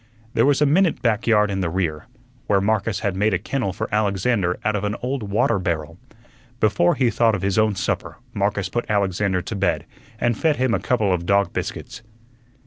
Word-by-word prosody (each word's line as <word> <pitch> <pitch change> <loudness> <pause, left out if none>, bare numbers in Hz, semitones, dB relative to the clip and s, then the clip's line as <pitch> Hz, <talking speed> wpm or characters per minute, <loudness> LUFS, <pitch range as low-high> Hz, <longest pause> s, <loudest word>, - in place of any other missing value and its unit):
There 115 +4 +3
was 145 +1 +3
a - - +4
minute 165 +4 +2
back 115 -1 +1
yard 105 -2 +3
in 95 - -2
the 85 - -1
rear, 80 -4 -2 0.4
where 100 - +3
Marcus 105 +1 0
had 100 -4 -1
made 105 +1 +2
a - - +2
kennel 115 +2 -2
for 90 - -4
Alexander 100 -2 +1
out 110 0 +1
of 105 - -2
an 105 0 -1
old 130 +1 -2
water 100 +1 +2
barrel. 85 -2 -3 0.6
Before 105 -6 +3
he 125 -3 +2
thought 115 -2 +2
of 95 - -5
his 100 +1 +1
own 110 -1 +2
supper - - -3 0.2
Marcus 100 -1 -1
put 120 +5 -3
Alexander 100 -2 0
to 110 - -5
bed 95 -2 0 0.3
and 120 -1 +1
fed 155 +6 +1
him 130 -3 0
a - - +1
couple 110 -6 +1
of 85 -1 -3
dog 100 0 +2
biscuits. 125 - -5
105 Hz, 205 wpm, -22 LUFS, 95-115 Hz, 0.6 s, a